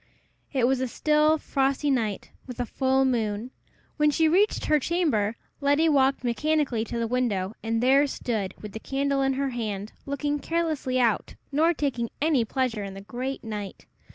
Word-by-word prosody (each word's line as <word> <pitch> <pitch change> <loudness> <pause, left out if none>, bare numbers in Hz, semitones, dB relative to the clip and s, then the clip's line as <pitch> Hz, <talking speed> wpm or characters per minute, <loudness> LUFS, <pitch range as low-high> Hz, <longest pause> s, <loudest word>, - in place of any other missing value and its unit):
It 260 -4 +2
was 260 +1 +2
a 260 - 0
still, 305 +4 +3
frosty 275 0 0
night, 220 -6 -1 0.2
with 250 -1 -8
a 245 - 0
full 265 +2 +1
moon. 225 -2 -1 0.5
When 300 -1 +4
she 320 +2 +3
reached 390 +7 +2
her 305 -1 +3
chamber, 270 - 0 0.2
Letty 285 +3 +3
walked 270 -3 +3
mechanically 265 -1 +1
to 235 - -4
the 230 - 0
window, 225 -5 -1
and 225 +1 -1
there 275 +3 +5
stood, 220 -8 -3
with 210 - -8
the 220 - -6
candle 275 +2 0
in 270 0 +2
her 275 0 -1
hand, 215 -3 -4
looking 290 +1 -1
carelessly 310 -6 -1
out, 230 -4 +1 0.2
nor 315 +4 +3
taking 245 -6 -1
any 295 -5 +3
pleasure 235 -3 -1
in 195 -1 -7
the 195 - -8
great 255 +6 -5
night. 210 -3 -6
260 Hz, 175 wpm, -26 LUFS, 230-290 Hz, 0.5 s, there